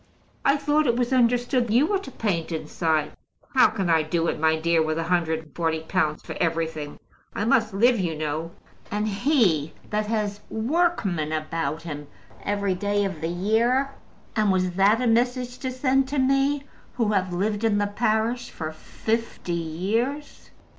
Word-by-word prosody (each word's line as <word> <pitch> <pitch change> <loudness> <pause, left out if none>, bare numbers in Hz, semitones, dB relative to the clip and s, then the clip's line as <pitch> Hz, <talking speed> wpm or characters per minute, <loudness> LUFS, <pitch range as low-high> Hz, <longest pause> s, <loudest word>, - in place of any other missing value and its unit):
"I 275 +1 +4
thought 295 +1 +2
it 235 - +3
was 245 +1 0
understood 245 0 +2
you 245 +7 +4
were 395 +2 +1
to 375 - -9
paint 190 -10 -2
inside." 155 -1 -1 0.4
"How 260 - +7
can 205 -4 -2
I 165 -1 +4
do 165 +2 -1
it, - - -3
my 160 0 +2
dear, 165 0 +2
with 155 0 0
a 165 - 0
hundred 165 -2 0
and 155 - -20
forty 160 -2 0
pounds 160 -2 -1
for - - -7
everything? 160 -3 -2 0.4
I 205 - -1
must 225 -3 +3
live, 235 +4 +3
you 170 -4 -1
know! 155 +1 -3 0.4
And 210 +1 -1
he 200 - +2 0.2
that 210 0 0
has 210 -2 -1
workmen 220 - 0
about 160 +1 -2
him 145 -3 -6 0.3
every 200 -1 0
day 205 +2 0
of 190 -6 -4
the 165 - -1
year! 230 +9 +1 0.4
And 215 -2 +3
was 185 -1 +1
that 195 +5 +4
a 255 - 0
message 245 +1 +1
to 260 - -3
send 260 +1 +1
to 285 +2 -3
me, 275 +2 +2 0.3
who 230 -3 +1
have 190 -3 +1
lived 205 +4 -1
in 220 -2 +3
the 205 - +2
parish 220 +3 0
for 155 -1 -5
fifty 220 +3 -3
years? 205 - -2
205 Hz, 175 wpm, -25 LUFS, 165-245 Hz, 0.4 s, How